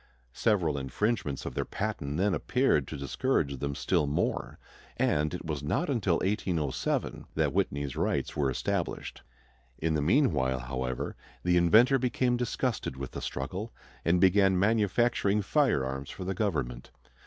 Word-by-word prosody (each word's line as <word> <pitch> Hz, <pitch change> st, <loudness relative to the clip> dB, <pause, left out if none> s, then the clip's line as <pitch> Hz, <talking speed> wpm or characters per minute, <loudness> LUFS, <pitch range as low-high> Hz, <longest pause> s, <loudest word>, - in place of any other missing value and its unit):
Several 85 Hz, -, +1 dB
infringements 75 Hz, -, -1 dB
of -, -, -4 dB
their -, -, -1 dB
patent 70 Hz, +2 st, -3 dB
then 100 Hz, +2 st, +2 dB
appeared 90 Hz, -, +1 dB
to 75 Hz, -, -6 dB
discourage 70 Hz, -, -1 dB
them 70 Hz, 0 st, -2 dB
still 75 Hz, -, +1 dB
more, 70 Hz, -, -1 dB, 0.4 s
and 75 Hz, +1 st, +1 dB
it 90 Hz, -, -6 dB
was 75 Hz, -3 st, -3 dB
not 140 Hz, -, 0 dB
until 100 Hz, -9 st, +1 dB
1807 90 Hz, -8 st, -1 dB
that -, -, +1 dB
Whitney's 70 Hz, -1 st, -1 dB
rights -, -, -1 dB
were 70 Hz, -2 st, +1 dB
established. 65 Hz, -, -3 dB, 0.6 s
In 80 Hz, 0 st, 0 dB
the 75 Hz, -, +1 dB
meanwhile, 75 Hz, -, +2 dB
however, 65 Hz, 0 st, -3 dB, 0.3 s
the 90 Hz, 0 st, +3 dB
inventor 110 Hz, +10 st, +5 dB
became 125 Hz, 0 st, +1 dB
disgusted 120 Hz, -, -2 dB
with 65 Hz, -1 st, -5 dB
the -, -, -6 dB
struggle 95 Hz, -, -4 dB, 0.3 s
and 85 Hz, +2 st, +3 dB
began 95 Hz, +1 st, +5 dB
manufacturing 105 Hz, 0 st, +2 dB
firearms 70 Hz, -, +1 dB
for 95 Hz, -, -7 dB
the 95 Hz, +1 st, -2 dB
government. 70 Hz, -, -2 dB
85 Hz, 145 wpm, -29 LUFS, 70-105 Hz, 0.6 s, inventor